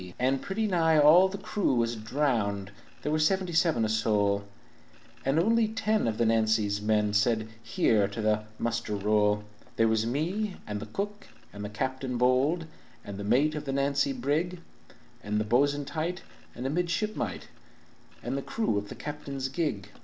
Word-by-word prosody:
"And 130 +2 +1
pretty 220 +3 -2
nigh 165 -5 +3
all 155 +5 +7
o' - - +3
the 195 +1 -5
crew 200 -8 0
was 120 0 +1
drowned 110 -5 -1 0.3
(There 150 - -1
was 155 0 +2
seventy 185 +1 +1
seven 160 -8 +3
o' - - +1
soul), 105 -2 +1 0.8
And 135 +3 +1
only 225 +5 +3
ten 215 - 0
of 110 -1 -1
the 115 - +2
Nancy's 110 -2 +2
men 105 -1 +1
Said 110 +1 +2
'Here!' 110 -3 +2
to 100 +3 -7
the 105 0 +1
muster 115 -2 -2
roll. 105 0 +2 0.3
"There 115 - +3
was 110 0 +1
me 185 - -2
and 105 -1 -4
the 110 - -7
cook 205 - -5 0.3
and 105 0 -7
the 105 - -4
captain 130 +3 -3
bold, 130 +7 +2 0.4
And 100 -1 -7
the - - -4
mate 140 +9 +3
of 150 -1 -5
the 135 - -2
Nancy 140 0 +1
brig 150 +8 -1 0.6
And 105 +1 -1
the 105 - -1
bo'sun 140 +5 +2
tight, 165 +4 -3 0.3
and 125 - -6
a 135 - 0
midshipmite, 175 - -2 0.7
And 125 +2 -2
the 140 - -2
crew 135 - -1
of 100 0 -9
the - - -7
captain's 140 -3 -5
gig. 130 - -2
130 Hz, 175 wpm, -28 LUFS, 110-155 Hz, 0.8 s, all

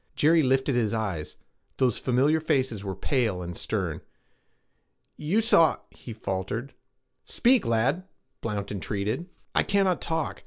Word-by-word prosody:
Jerry 160 +2 +4
lifted 135 0 +2
his 115 -3 +1
eyes. 95 -9 -3 0.4
Those 125 -4 +2
familiar 135 +5 +2
faces 130 -9 0
were 95 -2 -4
pale 110 -10 0
and 85 0 -6
stern. - - -3 1.1
'You 180 +9 +1
saw' 170 -8 +5
he 120 - -11
faltered. 110 +4 -4 0.5
'Speak, 250 - +2
lad!' 130 +11 +1 0.3
Blount 105 -3 -3
entreated. 105 - -3 0.2
'I - - +4
cannot 195 -3 +1
talk. 160 -3 -2
125 Hz, 125 wpm, -27 LUFS, 105-160 Hz, 1.1 s, saw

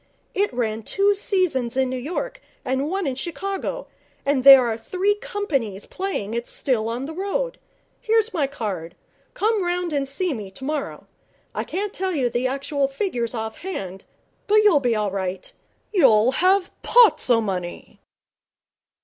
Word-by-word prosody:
It 405 +1 +1
ran 225 -3 -2
two 400 - +2
seasons 345 - 0
in 265 -1 +3
New 255 - -3
York - - -4 0.2
and 265 +3 -1
one 385 +1 -1
in 270 - 0
Chicago, 390 - -4 0.4
and 280 -2 +1
there 270 -2 +10
are 230 -2 0
three 370 - 0
companies 275 - -3
playing 370 - -4
it 235 +1 -3
still 230 -5 0
on 240 +3 -3
the 315 - -6
road. 400 +8 -2 0.4
Here's 445 0 +1
my 300 -6 +1
card. 190 -10 -5 0.4
Come 430 -1 +1
round 350 -1 -1
and 280 -1 0
see 310 +5 0
me 210 -6 -6
tomorrow. 275 +8 -5 0.5
I - - -2
can't 405 +2 -3
tell 375 -1 -2
you 250 -5 0
the 245 +2 0
actual 275 +1 -1
figures 270 - -2
off 220 -1 -5
hand, 195 - -6 0.4
but 425 +1 +5
you'll 385 -9 +6
be 245 -4 +1
all 210 -2 0
right. 190 -1 -4 0.4
You'll 250 - +5
have 370 +6 +2
pots 475 - +5
o' 235 -2 +5
money.' 185 -5 -5
275 Hz, 160 wpm, -23 LUFS, 230-385 Hz, 0.5 s, there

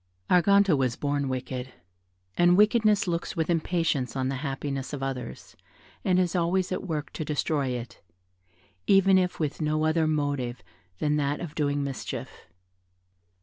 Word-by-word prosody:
Arganto 200 0 +5
was 130 -3 0
born 145 -1 -1
wicked, 130 0 -4 0.6
and 175 +1 +4
wickedness 210 -1 +4
looks 170 +1 -2
with 165 0 0
impatience 165 -6 0
on 130 -1 -1
the 135 - -2
happiness 140 -1 -4
of 135 -2 -4
others, 125 -3 -6 0.5
and 185 -1 +2
is 180 -1 +1
always 180 +2 +1
at 185 +1 -3
work 150 -4 -4
to 155 - -4
destroy 150 -1 -1
it, 125 -1 -5 0.9
even 195 -1 +5
if 180 -1 -1
with 155 -1 -2
no 155 0 +1
other 160 0 +2
motive 145 -5 -1 0.4
but 150 0 +1
that 145 0 0
of 165 -4 -6
doing 145 -2 0
mischief. 140 -2 -6
150 Hz, 150 wpm, -27 LUFS, 135-175 Hz, 0.9 s, Arganto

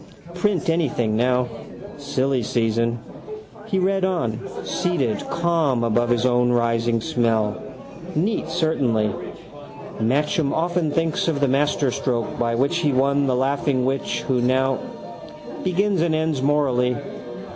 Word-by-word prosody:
Print 190 +1 0
anything 135 -10 +1
now. 125 +2 +2 0.5
Silly 135 -2 0
season. 115 +1 0 0.7
He 195 - -1
read 190 +1 +1
on, 125 -13 0 0.2
seated 135 - -1
calm 165 -8 +1
above 120 +1 +1
his 120 0 +2
own 125 -1 +3
rising 115 -1 +1
smell. 115 -7 0 0.5
Neat 180 +1 0
certainly. 125 -11 +1 0.9
Matcham 145 - +1
often 170 0 0
thinks 165 +2 0
of 155 -4 0
the 140 - +2
masterstroke 130 -4 0
by 115 -1 +1
which 135 +4 +1
he 150 -4 +2
won 140 +2 +2
the 130 - +2
laughing 135 0 +1
witch 130 -3 -1
who 125 -1 0
now. 130 +1 +2 0.8
Begins 190 0 +1
and 165 -1 +2
ends 155 -3 0
morally. 130 -4 +2
135 Hz, 125 wpm, -22 LUFS, 120-160 Hz, 0.9 s, own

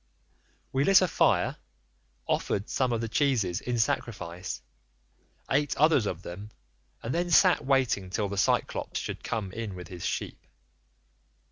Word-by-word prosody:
"We 135 +1 +1
lit 195 +3 +6
a - - +3
fire, - - +2 0.7
offered 100 +2 -1
some 130 -2 +1
of 115 -1 0
the 115 - -2
cheeses 110 -8 +1
in 125 -1 -2
sacrifice, 90 - -2 0.9
ate 145 +1 +1
others 145 -7 +4
of 90 -1 -4
them, 100 +5 -8 0.5
and 115 - -2
then 175 +1 0
sat 180 +1 +5
waiting 130 -8 +1
till 105 +2 -1
the 100 - -4
Cyclops 95 - 0
should - - -5
come 105 -4 -3
in 110 -2 -5
with 90 -2 -9
his 90 -2 -8
sheep. - - -4
115 Hz, 145 wpm, -28 LUFS, 95-135 Hz, 0.9 s, lit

